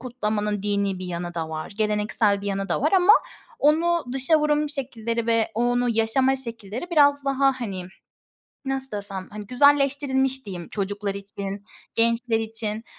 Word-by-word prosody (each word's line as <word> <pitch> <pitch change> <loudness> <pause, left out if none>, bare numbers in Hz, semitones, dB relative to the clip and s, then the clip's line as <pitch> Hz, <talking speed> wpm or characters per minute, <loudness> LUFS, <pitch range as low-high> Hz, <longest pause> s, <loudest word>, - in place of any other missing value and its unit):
kutlamanın 210 -4 -2
dinî 200 -2 0
bir 185 - -6
yanı 175 0 -5
da 160 -1 -3
var, 155 +5 -6
geleneksel 210 0 +1
bir 200 - -7
yanı 195 0 -2
da - - 0
var 305 +7 +1
ama 380 +2 +6 0.5
onu 335 +3 +2
dışa 270 +4 +4
vurum 300 0 +1
şekilleri 235 -5 -2
ve 230 -1 +2
onu 245 +1 +1
yaşama 235 +4 +2
şekilleri 230 - -7
biraz 285 -3 +4
daha, 275 -1 +1
hani, 190 -6 -4 0.8
nasıl 270 0 -3
desem, 200 -2 -6
hani, 210 0 -8
güzelleştirilmiş 270 0 +2
diyeyim 180 -4 -7
çocuklar 200 0 -3
için, 200 0 -6 0.3
gençler 230 0 +2
için. 220 0 -3
230 Hz, 150 wpm, -24 LUFS, 205-270 Hz, 0.8 s, ama